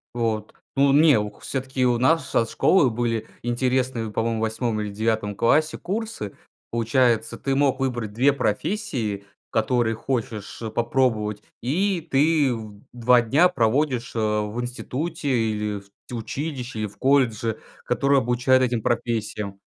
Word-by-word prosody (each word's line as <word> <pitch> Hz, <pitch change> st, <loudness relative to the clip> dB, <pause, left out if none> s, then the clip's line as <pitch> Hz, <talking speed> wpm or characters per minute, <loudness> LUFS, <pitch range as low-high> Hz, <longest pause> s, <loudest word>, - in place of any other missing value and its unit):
Вот, 115 Hz, -2 st, -1 dB, 0.2 s
ну 140 Hz, 0 st, +4 dB
не, 150 Hz, -3 st, +6 dB
у 105 Hz, 0 st, -2 dB
к -, -, -22 dB
всё-таки 130 Hz, -1 st, -2 dB
у 120 Hz, -1 st, +3 dB
нас 140 Hz, +3 st, +2 dB
нашей 115 Hz, -, +2 dB
школы 145 Hz, -10 st, +4 dB
были 115 Hz, -1 st, -1 dB
интересные 125 Hz, -1 st, 0 dB
по-моему 115 Hz, +1 st, -1 dB
8 110 Hz, 0 st, -1 dB
или 105 Hz, -1 st, -3 dB
9 110 Hz, -1 st, -1 dB
классе 155 Hz, +9 st, +2 dB
курсы. 210 Hz, -, -4 dB, 0.4 s
Получается, 115 Hz, -1 st, +1 dB
ты 135 Hz, 0 st, -1 dB
мог 135 Hz, -1 st, +2 dB
выбрать 120 Hz, -5 st, -2 dB
2 130 Hz, +6 st, +4 dB
профессии, 120 Hz, -, -2 dB, 0.3 s
которые 115 Hz, 0 st, +1 dB
хочешь, 115 Hz, -5 st, -4 dB
э, 110 Hz, -, -3 dB
попробовать, 115 Hz, -3 st, 0 dB, 0.2 s
и 170 Hz, -, 0 dB
ты 145 Hz, -1 st, +3 dB
в 110 Hz, -3 st, -8 dB
2 120 Hz, 0 st, +4 dB
дня 145 Hz, +10 st, +4 dB
проводишь, 125 Hz, -2 st, 0 dB
а, 105 Hz, -1 st, +1 dB
в 110 Hz, +4 st, -5 dB
институте, 130 Hz, +5 st, -4 dB
или 105 Hz, -4 st, 0 dB
в 100 Hz, -, -20 dB, 0.2 s
т 125 Hz, -, -6 dB
училище, 125 Hz, 0 st, -4 dB
и 105 Hz, -, -1 dB
в 100 Hz, -, -16 dB
колледже, 115 Hz, -5 st, +2 dB, 0.3 s
который 140 Hz, +3 st, +2 dB
обучает 125 Hz, +1 st, +2 dB
этим 120 Hz, -3 st, 0 dB
профессиям. 110 Hz, -4 st, -2 dB
120 Hz, 145 wpm, -24 LUFS, 110-135 Hz, 0.4 s, не